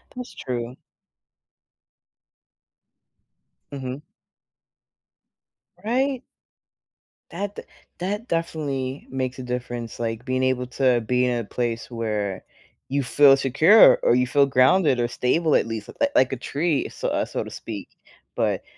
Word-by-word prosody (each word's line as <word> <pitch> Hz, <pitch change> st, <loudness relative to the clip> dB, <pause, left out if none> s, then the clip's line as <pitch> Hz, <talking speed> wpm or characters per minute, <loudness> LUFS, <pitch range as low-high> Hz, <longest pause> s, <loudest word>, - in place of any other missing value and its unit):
That's 250 Hz, 0 st, -7 dB
true. 120 Hz, -1 st, -5 dB, 3.0 s
Mhm. 135 Hz, 0 st, -6 dB, 1.8 s
Right? 260 Hz, +3 st, 0 dB, 1.1 s
That 200 Hz, +4 st, -4 dB
d -, -, -7 dB, 0.4 s
that 205 Hz, +6 st, -3 dB
definitely 145 Hz, -5 st, -3 dB
makes 130 Hz, -1 st, -3 dB
a 130 Hz, -, -5 dB
difference, 120 Hz, -1 st, -5 dB
like, 115 Hz, 0 st, -3 dB
being 130 Hz, 0 st, -1 dB
able 130 Hz, -1 st, +1 dB
to 125 Hz, -1 st, +2 dB
be 125 Hz, +3 st, +1 dB
in 125 Hz, -1 st, 0 dB
a 115 Hz, -, -3 dB
place 115 Hz, +1 st, -3 dB
where 105 Hz, -5 st, -3 dB, 0.5 s
you 140 Hz, +1 st, 0 dB
feel 135 Hz, +2 st, +6 dB
secure, 155 Hz, -, +6 dB
or 120 Hz, -, +4 dB
you 125 Hz, 0 st, +2 dB
feel 140 Hz, +2 st, +4 dB
grounded, 135 Hz, +2 st, +3 dB
or 120 Hz, -, +1 dB
stable 150 Hz, +6 st, +1 dB
at -, -, +3 dB
least, 115 Hz, -2 st, -5 dB
li 285 Hz, -, +5 dB
like 130 Hz, 0 st, +4 dB
a 135 Hz, -, -3 dB
tree, 150 Hz, +3 st, -1 dB
so -, -, -5 dB
uh, -, -, 0 dB
so -, -, -4 dB
to -, -, -9 dB
speak, -, -, -7 dB, 0.5 s
but -, -, 0 dB
130 Hz, 130 wpm, -23 LUFS, 120-155 Hz, 3.0 s, feel